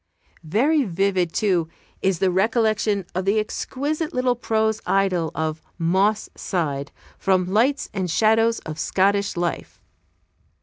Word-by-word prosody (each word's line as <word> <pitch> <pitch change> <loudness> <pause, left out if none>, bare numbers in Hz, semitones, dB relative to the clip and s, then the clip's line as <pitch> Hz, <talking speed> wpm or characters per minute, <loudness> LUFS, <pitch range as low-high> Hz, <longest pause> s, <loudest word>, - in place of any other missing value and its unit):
Very 275 - +2
vivid, 190 -3 0
too, 180 -6 +1 0.3
is 190 -2 +1
the 185 +2 +2
recollection 215 0 +1
of 185 - -1
the 200 +2 +2
exquisite 290 +8 -3
little 250 -1 +2
prose 220 -2 0
idyl 185 -4 +1
of 160 0 -2 0.2
"Moss 190 +5 +1
Side," 145 -6 -2 0.3
from 185 -2 +2
"Lights 235 +10 +1
and 190 -3 -2
Shadows 225 +6 +3
of 155 0 -7
Scottish 200 0 +1
Life." 175 -1 -3
195 Hz, 125 wpm, -23 LUFS, 175-220 Hz, 0.3 s, Shadows